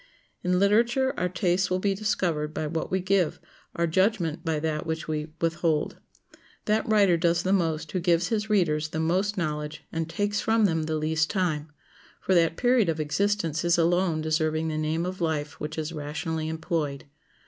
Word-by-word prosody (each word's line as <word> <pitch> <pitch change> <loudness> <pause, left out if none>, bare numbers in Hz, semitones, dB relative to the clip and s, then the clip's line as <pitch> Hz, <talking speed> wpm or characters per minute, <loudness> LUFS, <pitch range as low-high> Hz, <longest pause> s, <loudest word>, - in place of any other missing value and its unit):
In 180 0 +2
literature 235 +7 +3
our 180 - -1
tastes 180 +1 +1
will 185 - +1
be 195 +1 +1
discovered 175 -7 -1
by 155 - -2
what 160 +2 -3
we 190 0 0
give, 185 -3 +1 0.4
our 170 - +1
judgment 175 -2 +1
by 160 -2 0
that 155 0 -2
which 160 0 -3
we 155 -1 -2
withhold. 165 -1 0 0.7
That 215 +1 +1
writer 200 -5 +4
does 170 +1 +1
the 190 - +1
most 160 -4 0
who 185 - -1
gives 170 0 +2
his 220 -1 -1
readers 160 -7 +2
the 160 - -3
most 185 +6 0
knowledge 150 -3 -3
and 165 0 -3
takes 205 +3 -1
from 225 -1 +3
them 160 -4 +1
the 160 0 -1
least 155 +1 0
time, 160 -6 -1 0.5
for 190 - 0
that 165 -2 +3
period 245 -6 +3
of 160 -1 -1
existence 165 0 0
is 170 0 +3
alone 170 -1 +2
deserving 155 0 0
the 155 - -2
name 160 +2 -1
of 185 0 -5
life 155 -3 -2
which 150 +1 -5
is 160 +1 -3
rationally 155 +1 -3
employed. 160 -3 -3
165 Hz, 180 wpm, -26 LUFS, 155-190 Hz, 0.7 s, writer